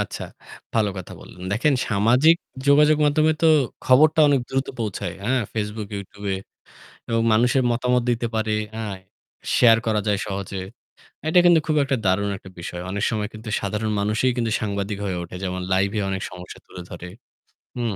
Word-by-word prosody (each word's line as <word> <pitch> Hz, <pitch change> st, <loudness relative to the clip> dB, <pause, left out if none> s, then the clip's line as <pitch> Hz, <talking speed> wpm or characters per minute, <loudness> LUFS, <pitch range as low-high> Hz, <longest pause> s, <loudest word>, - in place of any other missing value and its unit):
আচ্ছা, -, -, -4 dB, 0.5 s
ভালো 110 Hz, -3 st, +2 dB
কথা 95 Hz, -, -8 dB
বললেন। 90 Hz, -, -13 dB
দেখেন 130 Hz, +8 st, +2 dB
সামাজিক 120 Hz, +10 st, +4 dB, 0.3 s
যোগাযোগ 150 Hz, +2 st, +5 dB
মাধ্যমে 155 Hz, +2 st, +3 dB
তো -, -, +5 dB, 0.4 s
খবরটা 155 Hz, +5 st, +5 dB
অনেক 140 Hz, -2 st, +3 dB
দ্রুত 135 Hz, 0 st, -1 dB
পৌঁছায়। 110 Hz, -4 st, -3 dB
অ্যাঁ 125 Hz, +4 st, +1 dB
ফেসবুক, 105 Hz, -1 st, -4 dB
ইউটিউবে। 100 Hz, 0 st, -5 dB, 0.7 s
এবং 115 Hz, -1 st, +1 dB
মানুষের 125 Hz, +4 st, +3 dB
মতামত 125 Hz, +1 st, +1 dB
দিতে 120 Hz, 0 st, 0 dB
পারে। 110 Hz, -1 st, 0 dB, 0.2 s
অ্যাঁ 110 Hz, -3 st, -4 dB, 0.6 s
শেয়ার 115 Hz, -2 st, +6 dB
করা 110 Hz, -1 st, +1 dB
যায় 105 Hz, -1 st, +1 dB
সহজে। 100 Hz, -1 st, -4 dB, 0.7 s
এটা 165 Hz, +3 st, +5 dB
কিন্তু 175 Hz, -2 st, +6 dB
খুব 155 Hz, -, +1 dB
একটা 135 Hz, -1 st, 0 dB
দারুণ 100 Hz, +2 st, +2 dB
একটা 95 Hz, -, -13 dB
বিষয়। 85 Hz, +1 st, -6 dB
অনেক 100 Hz, +2 st, -3 dB
সময় 105 Hz, -2 st, -2 dB
কিন্তু 110 Hz, +1 st, -8 dB
সাধারণ 105 Hz, +2 st, -2 dB
মানুষই 110 Hz, +5 st, +1 dB
কিন্তু 115 Hz, -2 st, 0 dB
সাংবাদিক 100 Hz, -1 st, -2 dB
হয়ে 95 Hz, -2 st, -2 dB
ওঠে। 85 Hz, -, -9 dB
যেমন 90 Hz, -1 st, -3 dB
লাইভে 100 Hz, +3 st, +1 dB
অনেক 95 Hz, -1 st, -3 dB
সমস্যা 90 Hz, 0 st, -10 dB
তুলে 90 Hz, -, -10 dB
ধরে। 90 Hz, 0 st, -8 dB, 0.7 s
হু। 120 Hz, -, -2 dB
110 Hz, 165 wpm, -23 LUFS, 100-125 Hz, 0.7 s, শেয়ার